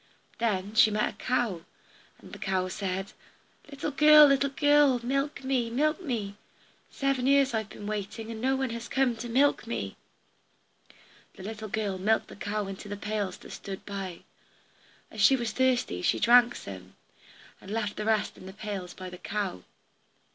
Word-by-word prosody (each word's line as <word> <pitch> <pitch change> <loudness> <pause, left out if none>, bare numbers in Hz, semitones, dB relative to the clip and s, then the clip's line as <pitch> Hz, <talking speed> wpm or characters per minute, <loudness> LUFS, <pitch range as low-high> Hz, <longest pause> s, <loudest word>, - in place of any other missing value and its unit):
Then 205 -3 -1
she 225 -1 +6
met 210 0 0
a - - -24
cow, 240 -9 -1 0.6
and - - -15
the - - -8
cow 185 -1 -1
said, 190 0 -4 0.6
"Little 285 +1 -4
girl, 300 +1 +8
little 275 0 +3
girl, 290 -2 +4
milk 275 +2 -1
me, 260 -3 0
milk 305 +7 0
me! 220 - -3 0.5
Seven 275 -2 0
years 275 -1 +4
have 220 -2 -1
I - - -13
been 205 - -9
waiting, 215 +2 -4
and 220 -1 -7
no 265 +2 +2
one 265 -2 -1
has 235 0 -6
come 265 -3 +1
to 240 +1 -6
milk 270 0 +2
me." 100 - -4 1.4
The 200 +4 -6
girl 205 -2 -2
milked 220 +4 +1
the - - -10
cow 205 +1 -3
into 195 +1 -8
the 205 - -4
pails 205 -2 -3
that - - -13
stood 195 -1 -7
by. 195 -4 -6 0.9
As 215 - -5
she 240 +6 +7
was 235 -4 -2
thirsty 250 - +1
she - - +2
drank 240 +1 +6
some, 95 -1 -9 0.7
and 190 - -12
left 210 -1 -2
the 210 - -3
rest 220 -1 0
in 185 - -11
the 190 - -9
pails 200 -3 -6
by 185 -1 -8
the 180 - -10
cow. 200 - -3
220 Hz, 175 wpm, -28 LUFS, 200-260 Hz, 1.4 s, girl